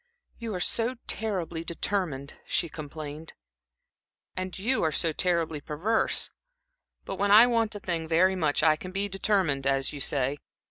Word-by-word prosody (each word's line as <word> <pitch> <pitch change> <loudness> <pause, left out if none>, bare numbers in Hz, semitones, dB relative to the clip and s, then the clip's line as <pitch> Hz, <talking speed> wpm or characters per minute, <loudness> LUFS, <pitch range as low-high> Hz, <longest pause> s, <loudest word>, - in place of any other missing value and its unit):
"You 230 -4 -4
are - - -3
so 230 +7 0
terribly 180 -7 -2
determined," 165 -5 -2
she 170 - 0
complained. 155 +1 -8 1.0
"And 185 0 -4
you 245 +7 0
are 160 - +2
so 165 +2 +2
terribly 165 -3 0
perverse! 185 +11 0 0.7
But 195 - -5
when 200 +1 +1
I 215 +4 +9
want 230 -3 +1
a - - -5
thing 170 -4 -3
very 185 +4 +3
much, 155 -5 +1
I 155 -1 +5
can 185 +3 -8
be 195 +2 -1
determined, 190 -8 0
as 135 0 +1
you 145 - -6
say. 140 +1 +1
170 Hz, 155 wpm, -27 LUFS, 155-200 Hz, 1.0 s, I